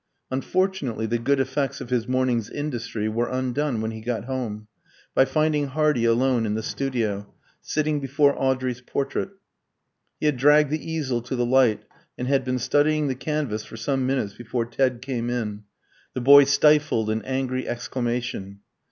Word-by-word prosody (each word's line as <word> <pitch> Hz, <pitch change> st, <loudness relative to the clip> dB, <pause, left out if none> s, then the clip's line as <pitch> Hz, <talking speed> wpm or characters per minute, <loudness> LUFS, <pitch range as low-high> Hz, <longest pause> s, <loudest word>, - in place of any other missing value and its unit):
Unfortunately 135 Hz, -, -1 dB
the 115 Hz, +2 st, -1 dB
good 140 Hz, +4 st, +1 dB
effects 135 Hz, +1 st, -1 dB
of 125 Hz, -2 st, -8 dB
his 120 Hz, -2 st, 0 dB
morning's 125 Hz, -4 st, 0 dB
industry 115 Hz, -7 st, -3 dB
were 115 Hz, +2 st, -1 dB
undone 130 Hz, -1 st, -1 dB
when 110 Hz, 0 st, -2 dB
he 110 Hz, 0 st, -8 dB
got 115 Hz, -1 st, -3 dB
home, 115 Hz, -5 st, -4 dB, 0.5 s
by 130 Hz, -, +5 dB
finding 150 Hz, +1 st, +1 dB
Hardy 150 Hz, -3 st, +1 dB
alone 120 Hz, 0 st, +2 dB
in 105 Hz, -, -1 dB
the 110 Hz, -, -3 dB
studio, 110 Hz, -7 st, -2 dB, 0.3 s
sitting 155 Hz, -1 st, -1 dB
before 140 Hz, +1 st, +2 dB
Audrey's 130 Hz, -2 st, -1 dB
portrait. 140 Hz, +8 st, -2 dB, 0.9 s
He -, -, -2 dB
had 150 Hz, -3 st, +2 dB
dragged 145 Hz, +2 st, +5 dB
the 155 Hz, +1 st, -3 dB
easel 135 Hz, -7 st, -1 dB
to 120 Hz, +3 st, -4 dB
the 120 Hz, -1 st, +1 dB
light, 125 Hz, -3 st, +3 dB, 0.3 s
and 125 Hz, -, -3 dB
had 135 Hz, 0 st, +2 dB
been 130 Hz, 0 st, -1 dB
studying 150 Hz, +3 st, +2 dB
the 130 Hz, -, -1 dB
canvas 135 Hz, -7 st, -2 dB
for 115 Hz, -, -11 dB
some 130 Hz, +2 st, -1 dB
minutes 130 Hz, -7 st, -1 dB
before 120 Hz, +1 st, -3 dB
Ted 125 Hz, +1 st, 0 dB
came 120 Hz, -3 st, -3 dB
in. 105 Hz, -4 st, -3 dB, 0.5 s
The 130 Hz, -, -2 dB
boy 140 Hz, +2 st, +8 dB
stifled 145 Hz, -5 st, +3 dB
an 110 Hz, +1 st, -1 dB
angry 130 Hz, +1 st, -2 dB
exclamation. 120 Hz, -5 st, -3 dB
130 Hz, 165 wpm, -24 LUFS, 115-140 Hz, 0.9 s, boy